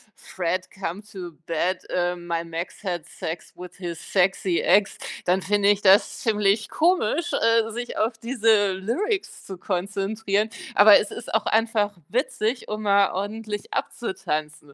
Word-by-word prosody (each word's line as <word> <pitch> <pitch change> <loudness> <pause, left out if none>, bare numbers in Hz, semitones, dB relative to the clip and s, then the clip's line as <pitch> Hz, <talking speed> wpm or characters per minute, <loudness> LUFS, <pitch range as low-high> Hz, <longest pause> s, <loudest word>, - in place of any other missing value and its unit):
„Fred, 180 0 -3
come 190 0 -5
to 190 -4 -9
bed“, 180 +3 -1
ähm, 175 -1 -1
„My 170 -1 -1
Max 165 +4 -6
had 175 -5 -3
sex 165 -1 -7
with 180 0 -10
his 175 -3 -5
sexy 190 -2 +2
ex“, 200 +3 +3 0.3
dann 185 +2 +2
finde 205 +1 +2
ich 205 -1 +3
das 195 +1 +4
ziemlich 210 -2 +1
komisch, 340 -1 +1
äh, 230 0 +2
sich 240 +2 -5
auf 225 +1 0
diese 220 -4 +2
Lyrics 360 - -2
zu 190 - -7
konzentrieren, 200 +3 -1 0.3
aber 205 0 +8
es 205 - -3
ist 235 - -8
auch 220 -1 +2
einfach 220 -2 +1
witzig, 245 -1 -1
um 215 0 -4
mal 200 -1 +4
ordentlich 210 +2 -4
abzutanzen. 155 -8 -4
200 Hz, 145 wpm, -24 LUFS, 180-220 Hz, 0.3 s, aber